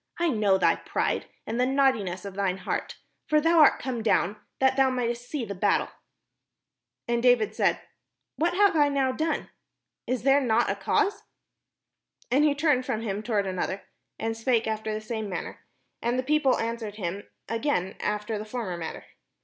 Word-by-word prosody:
I 345 0 +1
know 210 -7 +3
thy - - +3
pride, - - -2 0.2
and 230 +2 -3
the 250 - +4
naughtiness 240 -10 +1
of 200 - -6
thine 190 -1 -1
heart; - - -4 0.3
for 305 -1 +4
thou 330 +2 +4
art 300 - +7
come 250 -3 -3
down 210 -2 +1 0.2
that 265 0 +3
thou 270 -1 +4
mightest 245 -1 -2
see 285 -6 -2
the 200 - -5
battle." 200 +2 +1 1.2
And 235 0 +1
David 245 -3 +4
said: - - +1 0.5
"What 340 +3 0
have 405 -2 +4
I 295 -2 +4
now 275 -2 +1
done? 315 +5 -2 0.6
Is 255 -2 -1
there 275 +1 +5
not 235 -3 +2
a - - -2
cause? 405 - 0 0.6
" - - -38
And 275 +4 +4
he 295 -2 +3
turned 290 -4 +2
from 245 -4 -2
him 205 -2 -2
toward 215 -3 0
another, 190 +1 -3 0.3
and 225 0 -2
spake 230 0 +1
after 220 0 -2
the 215 0 -3
same 220 -1 -4
manner: 180 - -6 0.4
and 240 +2 0
the 255 - 0
people 290 -1 +2
an 230 +1 -2
swered 215 -3 -7
him 195 0 -4 0.2
again 225 -5 -1
after 210 +1 -2
the - - -4
former 215 -5 -4
manner. 165 -1 -6
235 Hz, 180 wpm, -27 LUFS, 210-270 Hz, 1.2 s, art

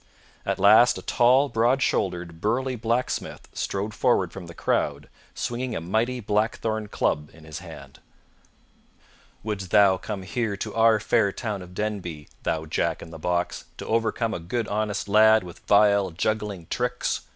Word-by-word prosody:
At - - 0
last 110 +5 +6
a - - -8
tall, 130 +4 +4
broad 120 +2 +2
shouldered, 85 -3 -1
burly 130 +4 0
blacksmith 120 +2 -2
strode 100 +2 -3
forward 100 -7 +1
from 95 -3 -8
the 85 - -11
crowd - - -1 0.3
swinging 120 0 -3
a - - -1
mighty 110 +9 -1
blackthorn 110 0 -1
club 75 -6 -1
in 80 - -16
his 80 -1 -7
hand. - - -12 1.4
"Wouldst 100 -4 -4
thou 95 -1 +5
come 100 0 -6
here 105 +1 -2
to 105 +1 -5
our 115 -1 +4
fair 110 -1 +2
town 105 -1 -4
of 90 0 -12
Denby, 95 -8 -4
thou 80 0 -2
Jack 80 +1 -1
in 80 - -11
the 80 - -9
Box, 90 +2 -2
to - - -7
overcome 115 0 0
a - - -3
good 110 +7 -3
honest 105 -1 -2
lad 110 +1 +5
with 90 -1 -11
vile, 100 -1 +4
juggling 100 +1 -2
tricks?" 125 0 -1
105 Hz, 160 wpm, -25 LUFS, 90-115 Hz, 1.4 s, last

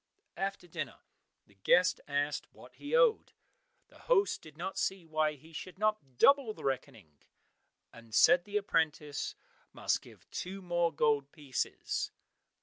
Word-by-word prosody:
After 195 -1 -3
dinner 155 -5 -6 0.4
the - - -24
guest 175 - +3
asked 145 +1 -1
what - - -15
he - - -2
owed. 480 -2 +4 0.6
The - - -19
host 405 -5 +2
did 155 -1 -14
not 180 +3 -4
see 190 -3 -1
why 155 -1 +1
he 155 +3 -16
should 185 +4 -7
not 215 - -1
double 275 - +5
the - - -11
reckoning, 110 - -4 0.7
and 115 -1 -14
said 175 +10 +6
the 205 0 -1
apprentice 155 -6 -1 0.4
must - - 0
give - - -17
two 190 +2 -5
more 175 -2 +1
gold 145 -2 +1
pieces. 145 -5 -3
160 Hz, 145 wpm, -32 LUFS, 145-195 Hz, 0.7 s, said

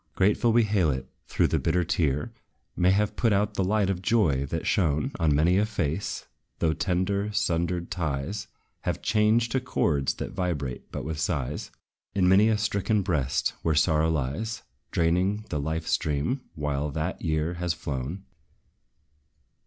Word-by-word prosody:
Grateful 105 +4 +3
we 120 +1 +5
hail 100 -6 +2
it, 65 -2 -2 0.3
though - - +5
the - - +1
bitter 90 +2 +1
tear 75 -5 0 0.4
May 90 0 +3
have 100 +2 +2
put 115 - +2
out 100 +1 +2
the 95 - 0
light 100 +1 +2
of 95 -2 -1
joy 85 - +2
that 80 +4 -3
shone 75 -6 +1
On 75 -3 +3
many 85 +6 +4
a 105 - +3
face; 90 -3 -2 0.3
though 80 -2 +1
tender, 100 +4 0
sundered 85 -3 -1
ties 85 +4 -3 0.3
Have - - -3
changed 110 +2 +3
to 130 - +2
chords 75 - 0
that - - -5
vibrate 75 -9 -3
but - - -5
with 80 -1 -4
sighs, 75 -7 -2 0.5
In 95 -2 +3
many 100 +4 +6
a 110 - +2
stricken 105 -1 0
breast 75 -9 0
where 80 -2 +1
sorrow 80 0 +3
lies, 80 - -2 0.3
Draining 90 +5 +1
the 75 - -1
life 80 +2 -2
stream, 80 - 0
while 75 -1 -1
that 80 +5 -3
year 80 +1 0
has 90 -1 -2
flown. 75 +7 -4
85 Hz, 160 wpm, -27 LUFS, 75-100 Hz, 0.5 s, many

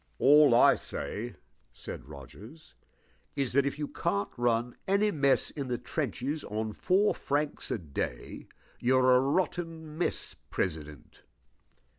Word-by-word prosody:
"All 145 -3 +6
I - - +7
say," 120 +4 -5 0.4
said - - -8
Rogers, 105 - -12 0.6
"is 135 -4 -1
that, 140 +1 +3
if 140 - -3
you 150 -1 -3
can't 100 -5 -2
run 120 0 0
any 200 +2 +3
mess 140 -5 +2
in 140 -3 -5
the 125 -1 -1
trenches 140 +3 -3
on 110 +1 -3
four 195 - +2
francs 145 +1 -2
a - - 0
day, 70 - -5 0.3
you're 130 0 +4
a - - +6
rotten 160 +2 -2
mess 175 - -2 0.2
president." 75 -5 -4
130 Hz, 130 wpm, -29 LUFS, 110-150 Hz, 0.6 s, I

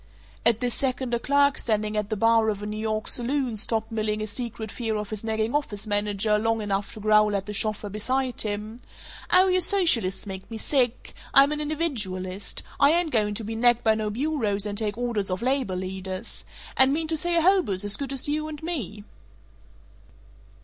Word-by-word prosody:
At 230 -2 +4
this 245 -1 0
second 255 -2 -2
a 235 - +1
clerk 280 +2 +3
standing 215 -1 0
at 210 -1 -1
the 215 - -1
bar 225 +1 +4
of 205 -1 -3
a - - -3
New 210 0 -4
York 215 0 -2
saloon 255 -1 0
stopped 220 +1 -1
milling 215 -1 -1
his 215 -1 -3
secret 225 -3 -4
fear 225 -3 -3
of 210 0 -4
his 215 -1 -5
nagging 220 +1 -1
office 225 -8 -2
manager 205 0 +1
long 225 +1 0
enough 200 -1 -2
to - - -8
growl 210 0 +4
at 195 -1 -2
the 210 - -6
chauffeur 210 0 -1
beside 250 +5 -1
him, 215 +2 -4 0.5
"Aw, 370 - +6
you 370 -1 +3
socialists 325 - +1
make 190 -1 -8
me 225 - -6
sick! 250 0 -1 0.2
I'm 275 +1 +7
an 300 0 -2
individualist. 205 - -3 0.2
I 280 0 +6
ain't 340 -2 +1
going 210 -4 +2
to 225 - -3
be 220 +2 -4
nagged 240 +1 +3
by 220 - +4
no 215 -1 -2
bureaus 220 -5 -1
and 205 -1 -3
take 210 0 -2
orders 235 -5 -1
off 185 +4 -3
labor 255 -7 0
leaders. 185 0 -6 0.3
And 265 0 +6
mean 320 +1 -1
to 325 - +1
say 345 +2 +1
a 335 - +4
hobo's 340 - +3
as 205 0 +3
good 275 -2 -5
as 270 0 -1
you 305 +1 -1
and 310 -1 -8
me?" 225 - -4
220 Hz, 200 wpm, -25 LUFS, 210-270 Hz, 0.5 s, I'm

